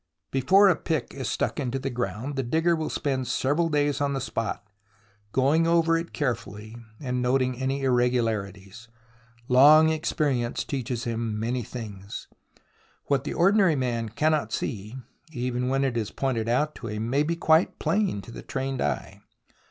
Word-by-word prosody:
Before 190 Hz, +10 st, +5 dB
a 185 Hz, -, +5 dB
pick 150 Hz, -6 st, -3 dB
is 130 Hz, -3 st, -4 dB
stuck -, -, -1 dB
into 135 Hz, -2 st, -2 dB
the 135 Hz, 0 st, -3 dB
ground, 120 Hz, +3 st, -3 dB
the 135 Hz, -, 0 dB
digger 160 Hz, +7 st, +1 dB
will 160 Hz, -1 st, -3 dB
spend 130 Hz, -3 st, -2 dB
several 155 Hz, +5 st, +1 dB
days 145 Hz, -1 st, +1 dB
on 140 Hz, -1 st, +1 dB
the 135 Hz, -, -1 dB
spot, 115 Hz, -5 st, -3 dB, 0.7 s
going 145 Hz, +7 st, +3 dB
over 165 Hz, -1 st, +3 dB
it 165 Hz, +1 st, -3 dB
carefully, 110 Hz, -6 st, -4 dB, 0.2 s
and 125 Hz, -3 st, -2 dB
noting 130 Hz, 0 st, +1 dB
any 135 Hz, +2 st, -2 dB
irregularities. 115 Hz, -5 st, -1 dB, 0.6 s
Long 150 Hz, +5 st, +7 dB
experience 145 Hz, -6 st, -1 dB
teaches 125 Hz, -3 st, -3 dB
him 115 Hz, -2 st, -2 dB
many 120 Hz, +3 st, -1 dB
things. 105 Hz, -4 st, -8 dB, 0.8 s
What 140 Hz, -2 st, +1 dB
the -, -, -3 dB
ordinary 190 Hz, -1 st, +4 dB
man 120 Hz, -4 st, -1 dB
cannot 150 Hz, 0 st, 0 dB
see, 105 Hz, 0 st, -4 dB, 0.4 s
even 125 Hz, -1 st, -2 dB
when 135 Hz, +1 st, +1 dB
it 130 Hz, -3 st, 0 dB
is 110 Hz, -2 st, -1 dB
pointed 120 Hz, -4 st, -2 dB
out 150 Hz, +6 st, +1 dB
to 115 Hz, -, -7 dB
him, 105 Hz, +1 st, -3 dB
may 135 Hz, +4 st, +2 dB
be 165 Hz, +3 st, 0 dB
quite 160 Hz, +1 st, +3 dB
plain 195 Hz, -, 0 dB
to -, -, -11 dB
the -, -, -8 dB
trained 135 Hz, -1 st, -3 dB
eye. 70 Hz, -3 st, -3 dB
130 Hz, 160 wpm, -26 LUFS, 115-150 Hz, 0.8 s, Long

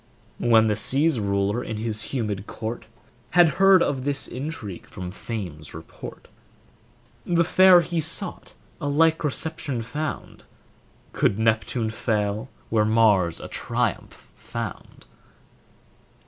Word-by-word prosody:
When 115 Hz, -2 st, +5 dB
the 105 Hz, -1 st, +1 dB
sea's 135 Hz, +6 st, +2 dB
ruler 100 Hz, +3 st, 0 dB
in 110 Hz, -, -5 dB
his 110 Hz, -1 st, -3 dB
humid 105 Hz, -6 st, -3 dB
court 115 Hz, +2 st, -6 dB, 0.5 s
Had 175 Hz, -2 st, +8 dB
heard 195 Hz, -2 st, +7 dB
of 135 Hz, -3 st, -1 dB
this 140 Hz, 0 st, -2 dB
intrigue 125 Hz, -, -6 dB
from 90 Hz, -2 st, -7 dB
fame's 90 Hz, -, -7 dB
report, -, -, -10 dB, 1.0 s
The 170 Hz, -1 st, +2 dB
fair 185 Hz, +1 st, +7 dB
he 170 Hz, -1 st, -2 dB
sought, 165 Hz, +4 st, -3 dB, 0.3 s
a 145 Hz, -, -2 dB
like 160 Hz, +3 st, +3 dB
reception 150 Hz, -4 st, -2 dB
found, 150 Hz, +6 st, -5 dB, 0.7 s
Could 100 Hz, -, +1 dB
Neptune 110 Hz, +1 st, 0 dB
fail 105 Hz, -2 st, -1 dB, 0.2 s
where 110 Hz, -1 st, +3 dB
Mars 105 Hz, -6 st, +3 dB
a -, -, -7 dB
triumph -, -, -3 dB
found? -, -, -7 dB
115 Hz, 120 wpm, -24 LUFS, 105-155 Hz, 1.0 s, Had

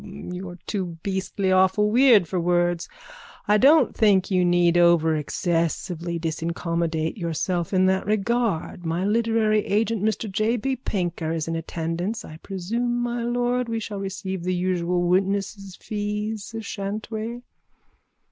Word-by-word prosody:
You're 180 Hz, -2 st, -7 dB
too 180 Hz, -5 st, -3 dB
beastly 190 Hz, 0 st, -1 dB
awfully 190 Hz, +3 st, +3 dB
weird 235 Hz, -7 st, +6 dB
for 185 Hz, -, -1 dB
words! 175 Hz, 0 st, +1 dB, 0.6 s
I 210 Hz, 0 st, +4 dB
don't 280 Hz, +1 st, +5 dB
think 200 Hz, -3 st, +3 dB
you 185 Hz, -1 st, +3 dB
need 175 Hz, -1 st, +3 dB
over 170 Hz, -2 st, +4 dB
excessively 170 Hz, +2 st, -2 dB
disincommodate 165 Hz, +1 st, -2 dB
yourself 170 Hz, 0 st, -2 dB
in 185 Hz, -1 st, +3 dB
that 190 Hz, 0 st, +1 dB
regard. 215 Hz, -4 st, 0 dB
My 170 Hz, +3 st, -1 dB
literary 220 Hz, -1 st, +2 dB
agent 215 Hz, +1 st, 0 dB
Mr 220 Hz, +1 st, 0 dB
J. 215 Hz, +4 st, +1 dB
B. 265 Hz, +4 st, -1 dB
Pinker 175 Hz, -9 st, -3 dB
is 165 Hz, -1 st, -2 dB
in 165 Hz, -, -2 dB
attendance. 165 Hz, +6 st, -3 dB
I 155 Hz, -, -10 dB
presume, 230 Hz, +8 st, -2 dB
my 240 Hz, 0 st, -2 dB
lord, 245 Hz, +1 st, 0 dB
we 225 Hz, 0 st, -1 dB
shall 210 Hz, -2 st, -5 dB
receive 190 Hz, -1 st, -4 dB
the 180 Hz, +1 st, -1 dB
usual 180 Hz, -1 st, 0 dB
witnesses' 195 Hz, +1 st, 0 dB
fees, 210 Hz, +1 st, -4 dB
shan't 205 Hz, +1 st, -5 dB
we? 230 Hz, +2 st, -4 dB
190 Hz, 140 wpm, -24 LUFS, 175-215 Hz, 0.6 s, weird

